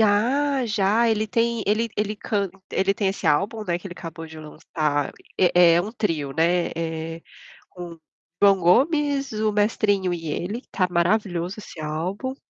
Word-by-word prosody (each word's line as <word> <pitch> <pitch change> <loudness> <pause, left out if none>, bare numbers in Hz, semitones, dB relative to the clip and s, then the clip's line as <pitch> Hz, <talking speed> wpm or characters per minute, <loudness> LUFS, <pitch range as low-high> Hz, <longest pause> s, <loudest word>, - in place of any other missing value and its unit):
Ah, 255 +6 +2
já, 215 +2 +2
ele 215 -1 +1
tem 230 0 0
ele 220 +3 +1
ele 210 0 -1
canta 200 -3 -2
ele 195 +1 +2
tem 200 -1 -1
esse 195 - -1
álbum, 205 +9 +1
né, 175 -2 -1
que 195 - -10
ele 175 - -7
acabou 165 0 -8
de 160 - -12
lançar, 150 -1 -2 0.3
é 175 -2 +5
é 170 - +4
um 210 +5 -5
trio, 160 - -2
né, 170 +3 +2
eh, 165 0 -4 0.5
com 175 -2 -8
o 165 - -18 0.4
João 195 -1 +6
Gomes, 280 - +2
o 215 0 0
Mestrinho 205 -3 +1
e 165 -2 -5
ele, 190 +10 -3
tá 185 -2 +1
maravilhoso 175 0 0
esse 185 -5 -10
álbum. 185 - -3
195 Hz, 170 wpm, -23 LUFS, 170-215 Hz, 0.5 s, João